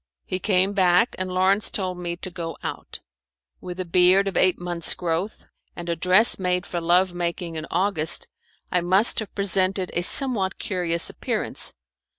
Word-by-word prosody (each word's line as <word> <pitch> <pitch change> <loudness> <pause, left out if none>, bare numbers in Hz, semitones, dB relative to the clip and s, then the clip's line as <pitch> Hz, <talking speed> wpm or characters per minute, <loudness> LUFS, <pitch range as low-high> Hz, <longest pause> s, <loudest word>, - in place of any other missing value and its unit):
He 185 - -4
came 190 0 +1
back, 185 +2 +2
and 185 0 -4
Lawrence 190 +3 +3
told 185 -3 -3
me 175 -1 -4
to 185 +1 -7
go 165 -3 -7
out. - - -7 0.6
With 180 0 -9
a 185 - -3
beard 180 +3 +3
of 195 - -4
eight 185 -1 +2
months' 175 -1 0
growth, 175 +4 -4 0.3
and 175 0 -8
a 170 - -1
dress 185 +8 +3
made 180 -1 -1
for 175 - -5
love 175 +2 +1
making 175 0 -4
in 160 0 -6
August, 175 -3 -1 0.4
I 180 - +1
must 190 +6 +3
have 220 - -8
presented 190 -1 +1
a 175 - -1
somewhat 200 -2 +3
curious 175 -3 +2
appearance. - - -2
180 Hz, 165 wpm, -22 LUFS, 175-190 Hz, 0.6 s, Lawrence